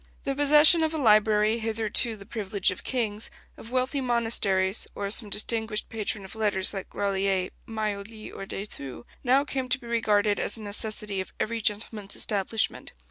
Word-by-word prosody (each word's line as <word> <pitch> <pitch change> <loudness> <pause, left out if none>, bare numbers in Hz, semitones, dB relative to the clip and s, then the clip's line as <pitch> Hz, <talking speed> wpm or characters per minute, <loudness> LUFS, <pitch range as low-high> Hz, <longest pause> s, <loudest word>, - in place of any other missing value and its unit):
The 275 - -1
possession 295 +4 +6
of 320 0 0
a - - -1
library, 215 -2 +4
hitherto 225 +1 +1
the 200 -2 -12
privilege 200 -3 -1
of 185 - -8
kings, 220 -4 0 0.3
of 225 - -12
wealthy 255 +3 -1
monasteries, 225 -6 +1
or 200 - -3
of 200 - -1
some 220 -3 +1
distinguished 220 +1 0
patron 215 -2 -4
of 190 - -10
letters 205 -3 0
like 195 -2 -6
Grolier, 195 -2 -1 0.2
Maioli, 215 0 -5
or 195 - -7
de 195 - -5
Thou, 135 - -9 0.2
now 265 +2 +3
came 260 -3 -3
to 255 - +3
be 245 - -15
regarded 210 -3 +1
as 205 - +2
a - - -10
necessity 210 -1 -1
of 190 - -10
every 230 +1 -2
gentleman's 210 -1 -1
establishment. 210 +1 -1
215 Hz, 175 wpm, -26 LUFS, 200-235 Hz, 0.3 s, possession